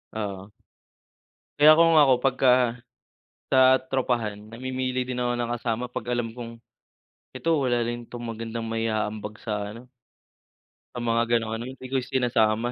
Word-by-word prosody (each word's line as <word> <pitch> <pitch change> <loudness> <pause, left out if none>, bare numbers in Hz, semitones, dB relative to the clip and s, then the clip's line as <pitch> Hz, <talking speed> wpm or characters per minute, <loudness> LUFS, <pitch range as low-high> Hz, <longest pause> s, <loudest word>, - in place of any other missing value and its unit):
Oo. 100 -2 -5 1.1
Kaya 150 +1 +9
kung 165 -1 +6
ako, 140 -3 +6
pagka 125 -2 +3 0.7
sa 130 0 +6 0.2
tropahan, 115 -5 -1
namimili 130 +2 -3
din 125 0 -4
ako 120 0 0
ng 120 0 -2
kasama 115 0 -2
'pag - - -5
alam 120 -2 -1
kong, 115 -1 -8 0.8
"Ito 155 +4 +1
wala 120 -2 +1
rin 120 0 -5
'tong 120 -1 -8
magandang 115 0 -5
mai-aambag 110 -2 -2
sa 105 -2 -3
ano 120 - -12 1.1
sa - - -3
mga 115 0 +2 0.2
ganong 110 -1 -4
ano." 115 +1 -4
Hindi 130 0 -11
ko - - -2
sinasama. 120 -3 +1
120 Hz, 140 wpm, -25 LUFS, 115-130 Hz, 1.1 s, Kaya